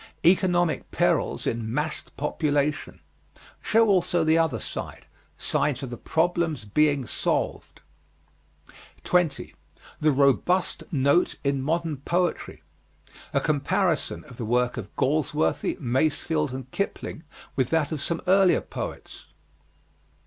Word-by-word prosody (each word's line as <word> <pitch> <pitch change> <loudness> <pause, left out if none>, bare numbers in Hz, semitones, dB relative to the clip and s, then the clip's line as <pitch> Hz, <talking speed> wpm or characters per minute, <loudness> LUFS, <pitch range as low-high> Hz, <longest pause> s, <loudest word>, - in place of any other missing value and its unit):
Economic 175 -2 +3
perils - - +1
in 115 -1 -2
massed 150 +4 -3
population. 145 0 -1 0.6
Show 225 +1 +3
also 180 -3 +2
the 160 0 +3
other 160 -7 +2
side. - - -6 0.3
Signs 145 -2 0
of 130 - -5
the - - -4
problem's 160 -4 0
being 145 +4 +2
solved. - - -2 1.2
20. 175 -5 0 0.5
THE 155 0 +3
ROBUST 140 +7 +2
NOTE 140 +3 +2
IN 140 -1 0
MODERN 160 +1 -1
POETRY. 175 +5 -2 0.7
A - - +2
comparison 155 +3 0
of 135 -6 -14
the - - -4
work 125 +2 +1
of 110 -5 -6
Galsworthy, 130 - 0
Masefield 150 +3 0
and 130 0 -7
Kipling 200 -5 -3 0.3
with 130 -3 +1
that 160 -2 +1
of 155 -3 -3
some 170 +2 -2
earlier 190 0 +4
poets. - - -7
150 Hz, 115 wpm, -25 LUFS, 135-170 Hz, 1.2 s, earlier